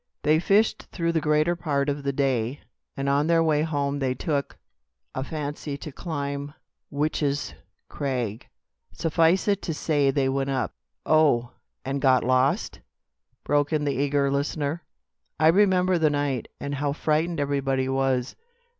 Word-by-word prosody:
They 155 Hz, +1 st, +4 dB
fished 200 Hz, +5 st, +2 dB
through 170 Hz, -2 st, -1 dB
the 165 Hz, -1 st, 0 dB
greater 150 Hz, +3 st, +2 dB
part 145 Hz, -4 st, -1 dB
of 145 Hz, 0 st, -1 dB
the 140 Hz, 0 st, -1 dB
day, 130 Hz, -2 st, -1 dB, 0.4 s
and 135 Hz, 0 st, -2 dB
on 140 Hz, +2 st, +2 dB
their 165 Hz, -1 st, +4 dB
way 155 Hz, -2 st, +2 dB
home 145 Hz, -3 st, -1 dB
they 130 Hz, -2 st, 0 dB
took 145 Hz, 0 st, -2 dB, 0.6 s
a 130 Hz, -, -3 dB
fancy 145 Hz, -1 st, -5 dB
to 150 Hz, -, -8 dB
climb 140 Hz, -2 st, -4 dB, 0.3 s
Witch's 145 Hz, -1 st, -1 dB, 0.3 s
Crag. 125 Hz, -7 st, -3 dB, 0.4 s
Suffice 165 Hz, -, +2 dB
it 200 Hz, -1 st, +2 dB
to 165 Hz, -, -3 dB
say 145 Hz, -3 st, +1 dB
they 135 Hz, 0 st, +1 dB
went 135 Hz, 0 st, -1 dB
up 130 Hz, -2 st, -1 dB, 0.2 s
" 70 Hz, -, -54 dB
"Oh! 120 Hz, -6 st, +2 dB, 0.3 s
and 135 Hz, +1 st, -2 dB
got 130 Hz, -2 st, +4 dB
lost!" 130 Hz, +2 st, +1 dB, 0.6 s
broke 145 Hz, 0 st, +1 dB
in 155 Hz, -2 st, +1 dB
the 140 Hz, -, +1 dB
eager 140 Hz, 0 st, +1 dB
listener. 145 Hz, +3 st, -1 dB, 0.6 s
"I 155 Hz, +1 st, +6 dB
remember 185 Hz, -1 st, +3 dB
the 155 Hz, -1 st, +4 dB
night, 145 Hz, -4 st, -1 dB
and 145 Hz, -, -4 dB
how 140 Hz, 0 st, -1 dB
frightened 160 Hz, +2 st, 0 dB
everybody 135 Hz, -2 st, 0 dB
was. 135 Hz, -1 st, 0 dB
145 Hz, 155 wpm, -25 LUFS, 135-155 Hz, 0.6 s, I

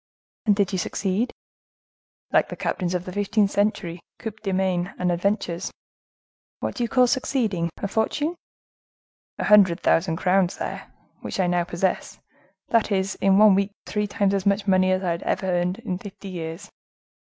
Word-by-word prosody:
"And 205 Hz, -, +5 dB
did 200 Hz, -2 st, +1 dB
you 190 Hz, -, -1 dB
succeed?" 200 Hz, +6 st, -1 dB, 1.0 s
"Like -, -, +3 dB
the -, -, -5 dB
captains 180 Hz, -1 st, -2 dB
of 180 Hz, 0 st, -2 dB
the 185 Hz, -, -6 dB
fifteenth 205 Hz, 0 st, +1 dB
century, 190 Hz, -4 st, 0 dB, 0.2 s
coups 220 Hz, -2 st, -7 dB
de 200 Hz, -3 st, -2 dB
main 185 Hz, -1 st, 0 dB
and 180 Hz, -1 st, +1 dB
adventures." 180 Hz, 0 st, -1 dB, 0.9 s
"What -, -, -3 dB
do -, -, -5 dB
you 235 Hz, -, -1 dB
call 255 Hz, -1 st, +5 dB
succeeding?—a 215 Hz, -, -1 dB
fortune?" 290 Hz, -, -1 dB, 1.0 s
"A -, -, -2 dB
hundred 195 Hz, -5 st, +6 dB
thousand 165 Hz, -1 st, +2 dB
crowns, 185 Hz, +1 st, +2 dB
sire, -, -, -6 dB, 0.3 s
which -, -, -5 dB
I 185 Hz, -, +3 dB
now 175 Hz, -1 st, +1 dB
possess—that 190 Hz, +5 st, -2 dB
is, 190 Hz, -1 st, +1 dB
in 195 Hz, 0 st, +4 dB
one 210 Hz, -1 st, +7 dB
week 200 Hz, +1 st, +1 dB
three 210 Hz, 0 st, -1 dB
times 200 Hz, -1 st, +1 dB
as 195 Hz, -1 st, 0 dB
much 200 Hz, 0 st, +2 dB
money 185 Hz, -1 st, +3 dB
as 185 Hz, +1 st, +1 dB
I 175 Hz, -2 st, +1 dB
ever 190 Hz, -, -2 dB
had 180 Hz, +1 st, 0 dB
in 205 Hz, -6 st, -4 dB
fifty 195 Hz, 0 st, -9 dB
years." 165 Hz, -1 st, -6 dB
195 Hz, 165 wpm, -24 LUFS, 180-205 Hz, 1.0 s, one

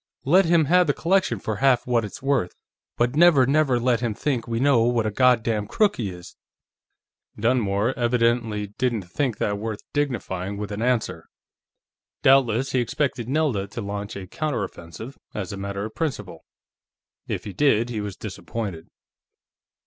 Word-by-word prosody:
Let 180 Hz, +7 st, +5 dB
him 165 Hz, -2 st, +4 dB
have 180 Hz, +3 st, +4 dB
the 145 Hz, -, +1 dB
collection 170 Hz, -, +1 dB
for 110 Hz, +2 st, -3 dB
half 135 Hz, -1 st, +3 dB
what 120 Hz, -2 st, +1 dB
it's 105 Hz, +4 st, -8 dB
worth, 135 Hz, -10 st, 0 dB, 0.4 s
but 120 Hz, +3 st, +1 dB
never, 155 Hz, -5 st, +6 dB
never 135 Hz, -2 st, +2 dB
let 120 Hz, 0 st, +2 dB
him 115 Hz, -4 st, -2 dB
think 130 Hz, -3 st, -2 dB
we 115 Hz, 0 st, -2 dB
know 135 Hz, -3 st, +4 dB
what 120 Hz, -1 st, +2 dB
a 110 Hz, -, 0 dB
God 125 Hz, +1 st, +4 dB
damned 105 Hz, -3 st, -1 dB
crook 210 Hz, -2 st, +2 dB
he 110 Hz, -5 st, -2 dB
is!" 90 Hz, -1 st, -11 dB, 1.0 s
Dunmore 115 Hz, -1 st, +1 dB
evidently 115 Hz, -4 st, 0 dB
didn't 120 Hz, -5 st, 0 dB
think 115 Hz, +6 st, -2 dB
that 100 Hz, 0 st, -1 dB
worth 110 Hz, 0 st, -4 dB
dignifying 100 Hz, -9 st, -2 dB
with 105 Hz, 0 st, -5 dB
an 105 Hz, +1 st, -4 dB
answer. 125 Hz, -1 st, -1 dB, 1.0 s
Doubtless 130 Hz, -1 st, +4 dB
he 130 Hz, -, +1 dB
expected 125 Hz, -1 st, -1 dB
Nelda 135 Hz, -9 st, 0 dB
to 105 Hz, +4 st, -6 dB
launch 100 Hz, 0 st, -5 dB
a 100 Hz, -1 st, -6 dB
counter 155 Hz, -, -2 dB
offensive, 85 Hz, -, -9 dB, 0.2 s
as 100 Hz, -2 st, -4 dB
a -, -, -6 dB
matter 100 Hz, +1 st, -4 dB
of 110 Hz, -, -7 dB
principle. 160 Hz, -5 st, -4 dB, 0.8 s
If -, -, -3 dB
he 100 Hz, -, -7 dB
did, 120 Hz, 0 st, +2 dB
he 110 Hz, -3 st, -3 dB
was 100 Hz, -2 st, -5 dB
disappointed. 95 Hz, -2 st, -6 dB
120 Hz, 165 wpm, -24 LUFS, 105-135 Hz, 1.0 s, never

